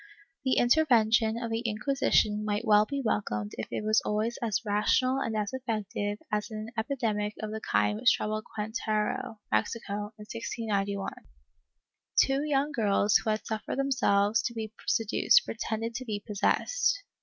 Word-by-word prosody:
^ - - -19 0.4
The 260 -1 +2
intervention 235 -5 +4
of 235 -1 -4
the 225 - 0
Inquisition 215 -2 +1
might 210 +2 -1
well 210 -1 +5
be 280 -1 -3
welcomed 105 - -1
if 110 - -3
it - - -3
was 215 +1 +3
always 215 +3 -1
as 225 -3 0
rational 235 +6 +2
and 225 -4 -2
as 210 +1 -2
effective 215 -5 -3
as 210 +1 -1
in 215 - -6
an 215 +1 -6
epidemic 220 -4 -1
of 215 -1 -4
the 220 0 -5
kind 210 0 +1
which 255 +2 +5
troubled 215 0 -2
Queretaro 215 0 -2
(Mexico) 205 - -1
in 210 - -10
1691. 205 -3 -3 1.0
Two 270 +1 +3
young 290 0 +1
girls 210 -4 +3
who - - -3
had 215 0 -1
suffered 220 +2 -4
themselves 225 -6 +2
to 235 - -4
be 220 -1 -5
seduced 230 - +3
pretended 225 0 -3
to 250 +2 -4
be 210 -3 -3
possessed. 480 - 0
220 Hz, 160 wpm, -29 LUFS, 210-240 Hz, 1.0 s, well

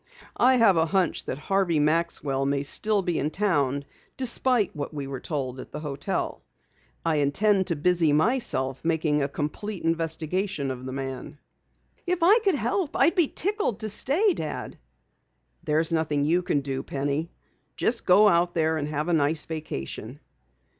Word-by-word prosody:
"I 255 +1 +5
have 225 -7 +4
a 160 0 +2
hunch 180 +1 0
that 130 - -4
Harvey 185 +1 0
Maxwell 150 -3 +1
may 140 0 0
still 210 +7 +1
be 175 -3 -1
in 150 - 0
town, 145 -8 0 0.3
despite 250 -5 +2
what 145 -1 -5
we 140 -2 -4
were 135 -1 -6
told 135 -5 -4
at - - -10
the 150 - -6
hotel. 145 -2 -3 0.6
I 160 -2 +1
intend 190 +7 +2
to 170 - 0
busy 165 0 +2
myself 150 - +1
making 160 -2 +1
a 140 - 0
complete 170 +8 -5
investigation 165 -1 -1
of 130 0 -7
the - - -5
man." 135 +2 -6 0.7
"If 355 -1 0
I 410 +7 +6
could 395 -6 +1
help, 285 - -2
I'd 335 - +4
be 350 -5 +3
tickled 400 - -1
to 215 - -2
stay, 320 - +3
Dad." 155 - -6 0.8
"There's 160 +2 +1
nothing 150 -3 0
you 170 +4 +2
can 145 -5 0
do, 135 -1 -3
Penny. 145 +4 -3 0.5
Just 230 0 0
go 200 +4 +6
out 175 -2 +2
there 160 -1 +1
and 145 -1 -3
have 150 +1 -3
a 175 - +1
nice 155 0 +2
vacation." 155 - -6
160 Hz, 165 wpm, -25 LUFS, 145-205 Hz, 0.8 s, I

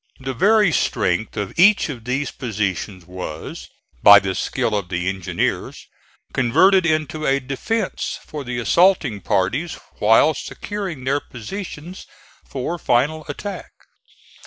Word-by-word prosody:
The 135 0 -4
very 205 - +4
strength 100 - 0
of 100 -2 -3
each 200 +3 +6
of 125 -7 -7
these 135 +3 -1
positions 100 -5 -3
was, 90 -3 -7 0.3
by 100 0 +10
the 95 -1 0
skill 110 - -1
of 100 -4 -3
the 90 0 -2
engineers, 95 -2 -2 0.5
converted 180 +9 +4
into 155 -1 -1
a 135 +1 +3
defence 185 - -3
for 150 -2 -6
the 125 -1 -4
assaulting 140 - +3
parties 130 - 0 0.2
while 115 +9 +5
securing 190 -1 -6
their 140 +2 +1
positions 170 - -8 0.4
for 150 +6 -4
final 150 +5 +1
attack. 200 +7 -6
135 Hz, 125 wpm, -21 LUFS, 105-165 Hz, 0.5 s, by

